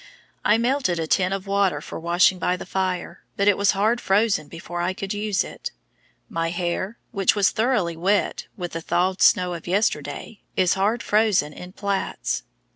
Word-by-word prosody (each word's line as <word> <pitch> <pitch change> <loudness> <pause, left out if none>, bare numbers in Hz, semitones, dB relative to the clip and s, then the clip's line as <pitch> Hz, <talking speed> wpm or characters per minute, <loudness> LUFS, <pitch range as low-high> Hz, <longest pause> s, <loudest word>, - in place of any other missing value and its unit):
I 210 - +4
melted 240 -6 +1
a 165 - -1
tin 180 +3 +2
of 195 0 -3
water 195 -6 +1
for 155 - -7
washing 175 +2 +3
by 180 0 0
the - - -8
fire, 185 -2 -2 0.2
but 200 - +2
it 205 - +6
was 200 0 +3
hard 220 +4 +2
frozen 195 -6 +2
before 170 +2 -6
I 180 +2 0
could 195 0 -4
use 205 -1 0
it. - - -7 0.6
My 165 0 -2
hair, 180 +5 -2
which 195 -2 +2
was 200 -2 +3
thoroughly 220 -7 +1
wet 190 +5 0
with 175 -3 -4
the 165 - -4
thawed 185 +3 0
snow 180 -1 +4
of 170 -1 -8
yesterday, 205 +2 -1
is 185 -1 +3
hard 210 +4 0
frozen 210 -9 +2
in 180 +3 -10
plaits. 200 -1 -2
190 Hz, 180 wpm, -23 LUFS, 175-205 Hz, 0.6 s, it